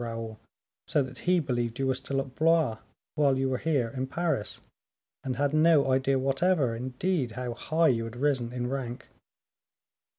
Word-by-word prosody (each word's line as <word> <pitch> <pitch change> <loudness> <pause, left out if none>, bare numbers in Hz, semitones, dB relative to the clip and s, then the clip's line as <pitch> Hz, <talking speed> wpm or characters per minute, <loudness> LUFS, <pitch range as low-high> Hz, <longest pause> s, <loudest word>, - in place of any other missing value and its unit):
Raoul, 115 -2 -5 0.5
so 145 - +2
that 130 0 -9
he 180 -1 +5
believed 120 -5 -2
you 135 - 0
were 130 - +2
still 135 +1 -3
at 135 -2 -9
Blois 160 -7 +2 0.3
while 140 -3 +3
you 135 0 +1
were 130 -1 -1
here 140 -7 +1
in 130 +2 -4
Paris, 160 -8 -2 0.6
and 130 -2 -2
had 140 +3 0
no 155 -3 +4
idea 135 +1 +2
whatever, 135 -1 +1
indeed, 130 - -2
how 125 0 -4
high 160 +7 +2
you 115 -3 +1
had 115 +1 -8
risen 125 -3 0
in 125 -1 -3
rank." 125 -2 -5
130 Hz, 170 wpm, -28 LUFS, 120-150 Hz, 0.6 s, he